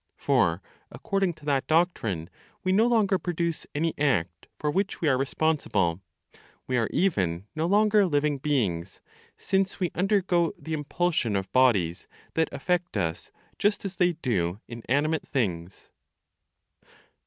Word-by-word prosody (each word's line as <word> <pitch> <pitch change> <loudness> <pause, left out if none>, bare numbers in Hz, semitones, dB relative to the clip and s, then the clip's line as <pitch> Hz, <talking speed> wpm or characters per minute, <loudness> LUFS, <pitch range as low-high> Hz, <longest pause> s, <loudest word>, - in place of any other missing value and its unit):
For, - - +1 0.3
according 195 -3 -1
to 155 -2 -17
that 140 -2 0
doctrine 115 - 0 0.3
we 185 - +1
no 215 +5 +4
longer 210 -5 +2
produce 170 -2 -2
any 160 +2 0
act 85 - 0
for 150 - -1
which 195 +4 -1
we 165 - 0
are 135 - +4
responsible, 130 - 0 0.6
we 130 - -1
are 115 -3 +1
even 95 - 0
no 160 +2 0
longer 210 +1 +4
living 145 -2 +1
beings, 100 - -1 0.4
since 190 0 0
we 180 -3 0
undergo 185 -3 +1
the 160 - -6
impulsion 150 - 0
of 95 -1 -2
bodies 100 -10 +2 0.3
that 160 -1 +1
affect 175 - -1
us 85 -4 -3 0.3
just 205 0 +1
as 190 -1 -5
they 180 -1 +3
do 100 - -1
inanimate 140 +7 -1
things. 95 - -3
150 Hz, 135 wpm, -27 LUFS, 105-180 Hz, 0.6 s, no